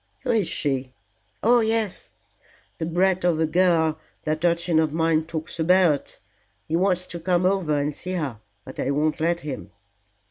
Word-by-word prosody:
"Who 260 Hz, -, -1 dB
is 215 Hz, -7 st, +2 dB
she? 130 Hz, -3 st, -2 dB, 0.5 s
Oh 240 Hz, +3 st, +5 dB
yes. 220 Hz, -3 st, -1 dB, 0.7 s
The 160 Hz, -, -2 dB
brat 185 Hz, +2 st, +1 dB
of 175 Hz, -3 st, +2 dB
a 160 Hz, -, +3 dB
girl 160 Hz, -2 st, +2 dB, 0.2 s
that 155 Hz, +1 st, -2 dB
urchin 170 Hz, -1 st, +2 dB
of 155 Hz, -1 st, 0 dB
mine 160 Hz, -1 st, +2 dB
talks 160 Hz, 0 st, -5 dB
about. 170 Hz, -3 st, +2 dB, 0.5 s
He 160 Hz, -, -1 dB
wants 180 Hz, 0 st, +2 dB
to 170 Hz, -, -7 dB
come 175 Hz, +1 st, +1 dB
over 185 Hz, -6 st, +1 dB
and 145 Hz, +1 st, -1 dB
see 185 Hz, +5 st, -6 dB
her, 140 Hz, -, -3 dB, 0.2 s
but -, -, -10 dB
I 130 Hz, -, -1 dB
won't 150 Hz, +2 st, 0 dB
let 170 Hz, +2 st, 0 dB
him." 145 Hz, -3 st, -6 dB
165 Hz, 170 wpm, -24 LUFS, 155-185 Hz, 0.7 s, Oh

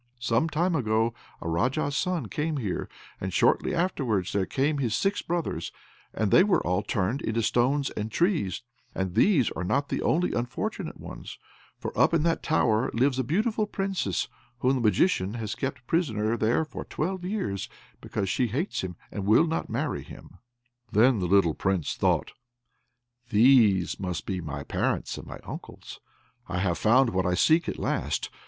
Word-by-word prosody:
Some 120 Hz, +6 st, +1 dB
time 170 Hz, +4 st, +1 dB
ago 115 Hz, -3 st, +1 dB, 0.3 s
a -, -, -5 dB
Raja's 130 Hz, -, 0 dB
son 180 Hz, -6 st, 0 dB
came 150 Hz, +7 st, -2 dB
here, 105 Hz, -9 st, -3 dB, 0.3 s
and 95 Hz, -, -3 dB
shortly 135 Hz, -, +2 dB
afterwards 125 Hz, -, 0 dB
came 145 Hz, +2 st, +1 dB
his 120 Hz, -5 st, 0 dB
six 200 Hz, +1 st, 0 dB
brothers, 170 Hz, -1 st, -3 dB, 0.4 s
and 110 Hz, -3 st, -1 dB
they 185 Hz, -, +7 dB
were 200 Hz, -1 st, +2 dB
all 90 Hz, +2 st, +1 dB
turned 105 Hz, +7 st, -1 dB
into 115 Hz, +1 st, -1 dB
stones 135 Hz, +6 st, +1 dB
and 105 Hz, +1 st, -4 dB
trees; 155 Hz, -, 0 dB, 0.3 s
and 95 Hz, -2 st, -2 dB
these 155 Hz, -, +3 dB
are 90 Hz, -, -4 dB
not 135 Hz, +10 st, 0 dB
the -, -, -1 dB
only 175 Hz, +3 st, +1 dB
unfortunate 120 Hz, 0 st, -3 dB
ones, -, -, -9 dB, 0.4 s
for -, -, -6 dB
up -, -, +4 dB
in 155 Hz, -, +2 dB
that 165 Hz, -1 st, +1 dB
tower 120 Hz, -7 st, +2 dB
lives 130 Hz, +2 st, +2 dB
a -, -, +2 dB
beautiful 210 Hz, -, 0 dB
Princess, 195 Hz, -, -1 dB, 0.3 s
whom 130 Hz, +1 st, +3 dB
the 130 Hz, -, 0 dB
Magician 110 Hz, -, +2 dB
has 110 Hz, -3 st, -3 dB
kept 130 Hz, -2 st, -4 dB
prisoner 115 Hz, -8 st, 0 dB
there 115 Hz, +7 st, +1 dB
for -, -, -7 dB
twelve 180 Hz, +3 st, -3 dB
years, 180 Hz, -, -3 dB, 0.3 s
because 100 Hz, -2 st, -3 dB
she 125 Hz, +6 st, +1 dB
hates 140 Hz, -, -2 dB
him 90 Hz, -2 st, -5 dB, 0.2 s
and 100 Hz, -2 st, -4 dB
will 110 Hz, +10 st, +6 dB
not 165 Hz, 0 st, -2 dB
marry -, -, -2 dB
him." -, -, -13 dB, 0.5 s
Then 115 Hz, +2 st, +4 dB
the 90 Hz, -, -1 dB
little 90 Hz, -3 st, +4 dB
Prince 95 Hz, -3 st, -1 dB
thought, -, -, +1 dB, 1.0 s
"These 110 Hz, -6 st, +4 dB
must 90 Hz, -3 st, -3 dB
be 95 Hz, -2 st, -3 dB
my 70 Hz, -3 st, -5 dB
parents -, -, -2 dB
and -, -, -10 dB
my -, -, -7 dB
uncles. -, -, -9 dB, 0.5 s
I 90 Hz, -, -2 dB
have 90 Hz, -2 st, 0 dB
found 120 Hz, +3 st, +4 dB
what 95 Hz, 0 st, 0 dB
I 90 Hz, -, +1 dB
seek 160 Hz, -, +3 dB
at -, -, -4 dB
last." -, -, -2 dB
120 Hz, 170 wpm, -27 LUFS, 100-160 Hz, 1.0 s, they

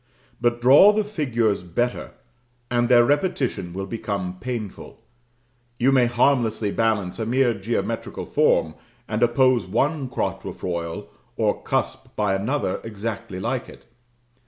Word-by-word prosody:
But 120 Hz, 0 st, +1 dB
draw 140 Hz, +11 st, +8 dB
the 215 Hz, 0 st, +1 dB
figures 120 Hz, -, 0 dB
better, 120 Hz, +8 st, -2 dB, 0.6 s
and 120 Hz, 0 st, +1 dB
their 120 Hz, -1 st, +6 dB
repetition 145 Hz, -, 0 dB
will 95 Hz, +2 st, -4 dB
become 100 Hz, -4 st, -4 dB
painful. 115 Hz, -3 st, -6 dB, 0.8 s
You 130 Hz, +3 st, +3 dB
may 130 Hz, -3 st, +4 dB
harmlessly 120 Hz, -4 st, +1 dB
balance 110 Hz, -4 st, 0 dB
a 110 Hz, -, -1 dB
mere 125 Hz, 0 st, +2 dB
geometrical 115 Hz, +3 st, -3 dB
form, 80 Hz, -1 st, +2 dB, 0.3 s
and 110 Hz, +1 st, -2 dB
oppose 120 Hz, -3 st, +3 dB
one 135 Hz, -, 0 dB
quatrefoil 85 Hz, -4 st, -4 dB, 0.3 s
or -, -, 0 dB
cusp -, -, -3 dB
by 105 Hz, -2 st, +1 dB
another 100 Hz, +1 st, -1 dB
exactly 110 Hz, -2 st, -5 dB
like 120 Hz, +5 st, -3 dB
it. -, -, -15 dB
115 Hz, 125 wpm, -23 LUFS, 100-125 Hz, 0.8 s, draw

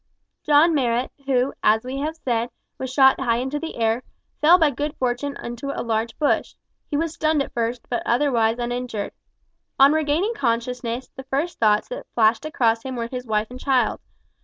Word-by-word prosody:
John 305 Hz, +3 st, +5 dB
Marrot, 245 Hz, -3 st, 0 dB, 0.2 s
who, 260 Hz, 0 st, +1 dB
as 220 Hz, +1 st, +3 dB
we 260 Hz, +2 st, -4 dB
have 310 Hz, +3 st, -2 dB
said, 240 Hz, -6 st, -1 dB, 0.3 s
was 260 Hz, -1 st, -4 dB
shot 265 Hz, 0 st, +5 dB
high 240 Hz, -3 st, +1 dB
into 265 Hz, +4 st, -2 dB
the 325 Hz, +1 st, -6 dB
air, 225 Hz, +1 st, +1 dB, 0.4 s
fell 330 Hz, +4 st, +7 dB
by 315 Hz, -4 st, +3 dB
good 290 Hz, +3 st, -3 dB
fortune 255 Hz, +3 st, -2 dB
into 240 Hz, +4 st, -5 dB
a -, -, -2 dB
large 225 Hz, 0 st, -1 dB
bush. 295 Hz, -, 0 dB, 0.3 s
He 290 Hz, -, -1 dB
was 325 Hz, +1 st, -1 dB
stunned 310 Hz, -3 st, +1 dB
at -, -, -10 dB
first, 235 Hz, +1 st, -2 dB
but 240 Hz, -, -2 dB
otherwise 235 Hz, -3 st, +2 dB
uninjured. 245 Hz, -3 st, -3 dB, 0.7 s
On 275 Hz, +2 st, +7 dB
regaining 315 Hz, +8 st, +1 dB
consciousness, 245 Hz, -, -2 dB
the 265 Hz, -, -8 dB
first 290 Hz, +6 st, -2 dB
thoughts 210 Hz, -2 st, +3 dB
that -, -, -7 dB
flashed 225 Hz, +4 st, +3 dB
across 230 Hz, -7 st, +1 dB
him 260 Hz, +1 st, -5 dB
were 230 Hz, -1 st, -3 dB
his 250 Hz, -1 st, -6 dB
wife 215 Hz, +1 st, -1 dB
and 250 Hz, -, -8 dB
child. 265 Hz, -2 st, +1 dB
255 Hz, 185 wpm, -23 LUFS, 235-290 Hz, 0.7 s, fell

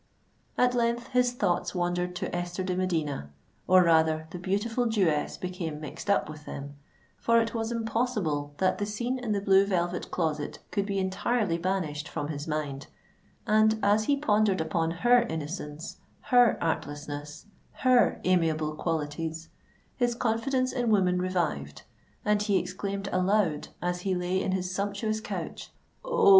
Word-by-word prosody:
At 250 Hz, 0 st, +4 dB
length 235 Hz, 0 st, 0 dB
his 250 Hz, -1 st, +3 dB
thoughts 185 Hz, -6 st, 0 dB
wandered 180 Hz, 0 st, -1 dB
to 175 Hz, -, -3 dB
Esther 175 Hz, +1 st, -3 dB
de 185 Hz, -1 st, -1 dB
Medina—or 160 Hz, -, 0 dB
rather, 160 Hz, -1 st, +3 dB
the 180 Hz, -, -6 dB
beautiful 215 Hz, +6 st, 0 dB
Jewess 185 Hz, -10 st, +1 dB
became 180 Hz, -4 st, -4 dB
mixed 155 Hz, +6 st, -7 dB
up 200 Hz, -, +3 dB
with 155 Hz, 0 st, -10 dB
them; 140 Hz, +1 st, -7 dB, 0.4 s
for 230 Hz, 0 st, +4 dB
it 230 Hz, 0 st, -1 dB
was 225 Hz, 0 st, -2 dB
impossible 220 Hz, -11 st, -1 dB
that 185 Hz, -, +1 dB
the 205 Hz, -, -1 dB
scene 240 Hz, +5 st, -2 dB
in 240 Hz, -3 st, -3 dB
the 205 Hz, -, +1 dB
Blue 195 Hz, -1 st, +5 dB
Velvet 180 Hz, -2 st, -1 dB
Closet 155 Hz, -4 st, -2 dB
could 200 Hz, 0 st, 0 dB
be 200 Hz, -1 st, -1 dB
entirely 190 Hz, 0 st, 0 dB
banished 165 Hz, -5 st, -2 dB
from 145 Hz, 0 st, -4 dB
his 145 Hz, 0 st, -5 dB
mind;—and, 155 Hz, +8 st, -1 dB
as 210 Hz, +2 st, +3 dB
he 285 Hz, +3 st, +2 dB
pondered 210 Hz, -, +2 dB
upon 160 Hz, +1 st, 0 dB
her 240 Hz, +9 st, +4 dB
innocence—her 175 Hz, -, 0 dB
artlessness—her 150 Hz, -, -1 dB
amiable 160 Hz, -4 st, +2 dB
qualities, 160 Hz, 0 st, -3 dB, 0.5 s
his 245 Hz, -2 st, +1 dB
confidence 255 Hz, +3 st, 0 dB
in 245 Hz, -3 st, 0 dB
woman 185 Hz, -4 st, +3 dB
revived, 165 Hz, -, -2 dB, 0.4 s
and 210 Hz, 0 st, +3 dB
he 205 Hz, -2 st, +2 dB
exclaimed 195 Hz, +2 st, -3 dB
aloud, 185 Hz, -4 st, +1 dB, 0.2 s
as 180 Hz, 0 st, -1 dB
he 190 Hz, 0 st, 0 dB
lay 180 Hz, +1 st, 0 dB
in 190 Hz, -, -1 dB
his 185 Hz, -1 st, -2 dB
sumptuous 205 Hz, +2 st, -1 dB
couch, 220 Hz, -, -6 dB, 0.3 s
"Oh! 480 Hz, -4 st, +3 dB
185 Hz, 145 wpm, -28 LUFS, 160-215 Hz, 0.5 s, Blue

